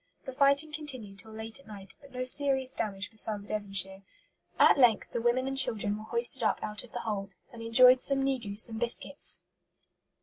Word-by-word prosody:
The 265 - -7
fighting 280 +3 +2
continued 255 -10 -7
till 220 +3 -11
late 220 +3 -7
at 275 - -21
night, 195 -3 -10
but 280 -1 -17
no 255 0 -5
serious 265 0 +2
damage 205 -5 -5
befell 220 -1 -7
the 200 - -13
Devonshire. 195 -2 0 0.6
At - - +4
length 235 -5 +2
the 235 - -4
women 240 +2 0
and 270 - -4
children 210 -6 +1
were 215 +1 -10
hoisted 235 +2 0
up 220 - 0
out 210 0 -5
of 245 - -16
the 240 - -6
hold, 200 -3 -5 0.2
and 230 - -11
"enjoyed 250 +3 +5
some 275 -1 +1
negus 230 -6 0
and 225 -1 -7
biscuits." 240 +4 +3
230 Hz, 195 wpm, -28 LUFS, 210-260 Hz, 0.6 s, enjoyed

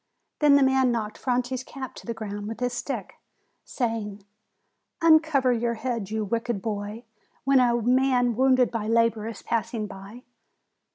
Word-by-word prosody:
Then 295 -2 +6
the 280 - +5
man 265 -1 +3
knocked 215 -3 -3
Franti's 250 0 -1
cap 260 -1 -8
to - - -13
the 230 - -2
ground 205 -2 -6
with 225 +1 -6
his 250 0 -1
stick, 240 -4 -5 0.4
saying: 215 -5 -3 0.7
"Uncover 315 -6 +4
your 235 0 -1
head, 230 -4 -3
you 220 0 -2
wicked 230 +1 -2
boy, 210 +2 -5 0.4
when 275 0 +4
a 240 -1 +3
man 250 0 +2
wounded 255 0 +3
by 225 -3 -3
labor 230 -1 +2
is 230 - -8
passing 230 -1 -2
by!" 200 +4 -11
235 Hz, 155 wpm, -25 LUFS, 220-255 Hz, 0.7 s, Then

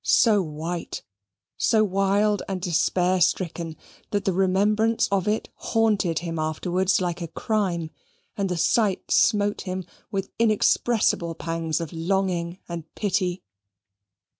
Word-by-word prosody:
So 215 -4 +4
white, 165 +1 -5 0.5
so 220 -1 +3
wild 200 +1 +2
and 190 -1 -3
despair 180 +1 +1
stricken, 170 -1 0 0.3
that 205 -1 -1
the 190 - +2
remembrance 205 +4 +2
of 195 -1 0
it 215 +1 0
haunted 210 -7 +1
him 165 -1 -3
afterwards 180 +4 0
like 175 -1 -2
a 170 - -3
crime, 170 -3 -1 0.4
and 200 -2 -1
the 180 - -1
sight 200 +2 +1
smote 205 -2 +3
him 185 -1 -4 0.2
with 195 -3 -3
inexpressible 215 -5 +2
pangs 165 -1 -2
of 165 -2 -5
longing 175 0 -1
and 170 -2 -6
pity. 185 -3 -1
185 Hz, 125 wpm, -25 LUFS, 170-205 Hz, 0.5 s, So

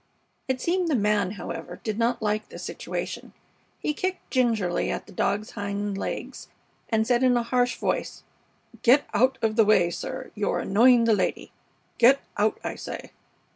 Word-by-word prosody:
It 260 -1 -1
seemed 355 +4 0
the 310 - +2
man, 205 -3 +1
however, 190 -4 -7
did 215 0 -3
not 235 0 +1
like 215 0 -1
the - - -10
situation. - - -5 0.5
He 300 - -1
kicked 370 +4 -4
gingerly 225 -9 +1
at - - -3
the - - -15
dog's 205 +2 -1
hind 205 -1 -3
legs, 195 - -5 0.4
and 220 -1 +2
said 240 +1 +2
in 250 -1 +4
a 240 - +1
harsh 245 +1 +1
voice: - - -2 0.6
"Get 265 +5 +5
out 260 +2 +3
of 220 0 +1
the 225 - +7
way, 185 -5 +4
sir. 260 +8 -6
You're 210 -1 -1
annoying 235 +4 +5
the 230 -1 +4
lady. 195 -3 -1 0.5
Get 265 +4 +6 0.2
out, 210 +1 +1
I - - -4
say!" - - -7
225 Hz, 170 wpm, -26 LUFS, 205-255 Hz, 0.6 s, the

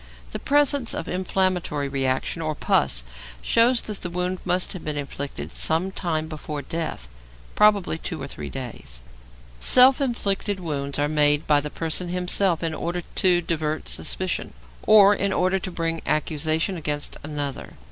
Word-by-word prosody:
The - - -4
presence 285 -4 +2
of - - -4
inflammatory 180 -5 0
reaction 135 +4 -1
or 155 -1 -2
pus - - +1 0.4
shows 230 - +3
that 210 -2 -5
the 180 - -3
wound 180 +1 -2
must 180 +2 0
have 185 - -8
been 150 -1 -3
inflicted 140 - -5
some 165 +4 0
time 160 -4 -2
before 150 -2 -6
death, 160 - -4 0.5
probably 200 -6 +3
two 165 -1 -5
or 135 - -5
three 140 - -7
days. 120 - -8 0.6
Self 255 - +6
inflicted 205 -6 0
wounds 140 -5 -3
are 145 0 +1
made 150 0 +2
by 145 -1 +3
the 150 - -5
person 165 +3 -2
himself 180 -1 +1
in 165 -1 -1
order 175 +2 -3
to 175 0 +1
divert 155 -2 -3
suspicion, 185 -1 -1 0.3
or 205 -1 +7
in 200 -1 0
order 185 +1 +1
to 190 - -5
bring 165 -2 -2
accusation 155 +4 0
against 150 -2 -3
another. 145 -2 -5
165 Hz, 155 wpm, -24 LUFS, 150-185 Hz, 0.6 s, or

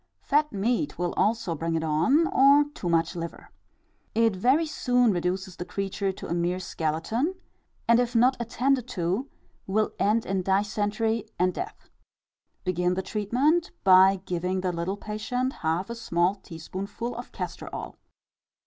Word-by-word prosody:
Fat 300 +1 +2
meat 240 +8 -1
will 175 0 -1
also 220 -4 +1
bring 165 +1 -2
it 160 - -1
on, 165 - +3
or 280 +2 +6
too 180 - -4
much 165 0 +1
liver. 170 -1 -7 0.6
It 225 -2 +3
very 260 - +3
soon 250 -6 +2
reduces 180 0 -2
the - - -4
creature 195 +2 -2
to 190 - -9
a - - -2
mere 175 +1 0
skeleton, 185 - -1 0.5
and 235 0 +6
if 245 -1 0
not 250 +3 +5
attended 250 +2 0
to, 185 +11 -1 0.4
will 215 +3 +1
end 215 +3 +2
in 190 0 -1
dysentery 205 +3 0
and 180 +1 +2
death. 405 +3 -7 0.7
Begin 180 -1 0
the 190 - -2
treatment 255 - +1
by 190 0 +6
giving 180 +1 -1
the 185 -1 0
little 175 +3 -3
patient 245 +5 -2
half 165 +4 0
a 235 - -5
small 180 -5 +1
teaspoonful 195 +6 -6
of 240 - -8
castor - - -6
oil. - - -6
200 Hz, 150 wpm, -26 LUFS, 180-240 Hz, 0.7 s, or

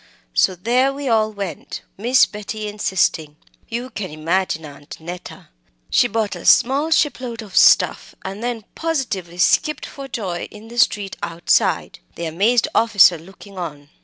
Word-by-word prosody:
So 180 - +3
there 245 +8 +2
we 280 0 -5
all 220 -2 +2
went, 200 -4 -6
Miss 245 +5 +4
Betty 210 +1 -6
insisting. 185 -7 0 0.3
You 240 +3 -4
can 195 -4 -5
imagine 160 +1 -1
Aunt 145 -1 -11
Neta. 175 +2 -9 0.4
She - - +4
bought 220 -1 -2
a - - -9
small 275 +5 +4
shipload 250 -7 0
of 205 - -12
stuff - - +4
and 195 +4 -6
then 235 -3 -3
positively 235 - -3
skipped 305 +11 +2
for 275 -1 -9
joy 190 -9 -4
in 215 +2 -13
the 240 +1 -5
street 205 -4 +1
outside 170 0 0 0.2
the 170 - -5
amazed 210 +9 +2
officer 200 -7 +5
looking 195 +3 -13
on. 145 -4 -7
205 Hz, 150 wpm, -20 LUFS, 175-240 Hz, 0.4 s, officer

